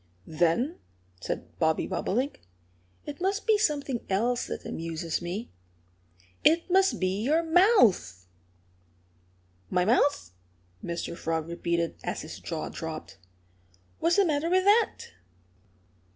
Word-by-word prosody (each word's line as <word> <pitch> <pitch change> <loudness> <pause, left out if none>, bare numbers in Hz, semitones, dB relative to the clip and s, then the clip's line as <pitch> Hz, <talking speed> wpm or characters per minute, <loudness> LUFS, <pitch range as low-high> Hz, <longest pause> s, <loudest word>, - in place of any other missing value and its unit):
"Then," 175 - 0 0.4
said - - -6
Bobby 160 0 +2
Bobolink, 255 +8 -2 0.6
"it 295 +2 -7
must 390 +3 0
be 435 -2 +4
something 285 - 0
else 235 +6 0
that - - -6
amuses 165 0 -3
me. 180 +7 -5 0.9
It 335 +3 +3
must 385 +1 +3
be 185 +2 0
your 310 +8 +2
mouth!" 320 - +4 1.4
"My 180 0 +1
mouth!" 245 - +2 0.5
Mr. 170 0 -4
Frog 160 -1 -2
repeated, 170 0 -2
as - - -3
his - - -8
jaw - - -4
dropped. - - -7 0.8
"What's 335 +1 +2
the 400 - +4
matter 310 0 0
with 370 +1 +3
that?" 420 +3 +2
245 Hz, 115 wpm, -28 LUFS, -, 1.4 s, be